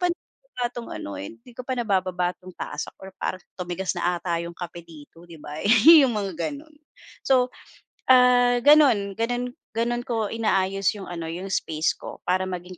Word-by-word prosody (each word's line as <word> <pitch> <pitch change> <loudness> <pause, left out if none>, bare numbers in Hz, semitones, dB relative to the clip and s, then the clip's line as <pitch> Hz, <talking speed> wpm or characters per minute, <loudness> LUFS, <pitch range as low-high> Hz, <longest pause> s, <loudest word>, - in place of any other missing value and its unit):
pa 360 - +2
na 350 - -7
itong 240 -1 -7
ano 100 - -6
hindi 115 - -11
ko 245 - -9
pa 260 - -2
nabababa 185 -5 0
itong 185 -1 -13
tasa - - -5
ko 190 0 -11
parang 185 - -3 0.2
tumigas 180 +1 -2
na 175 0 0
'ata 170 -1 -2
'yong 170 0 -7
kape 175 -1 -7
dito 165 +1 -15
'di 165 - -11
ba. 150 +1 -7
Eh, - - -1 0.4
yung 240 -4 0
mga 200 -2 -2 0.2
ganun. 300 +2 -10 0.5
So, 255 -2 +3 0.6
ah, 245 -1 +5
gano'n, 245 -9 +5
ganun, 245 +2 -2 0.2
ganun 240 +1 -1
ko 225 -5 -1
inaayos 195 -3 +1
'yong 200 -2 -9
ano 170 -2 -5
'yong 180 +4 -6
space 160 -4 -1
ko - - -10
para 185 +1 +1
maging 180 -1 -7
195 Hz, 180 wpm, -24 LUFS, 175-245 Hz, 0.6 s, ah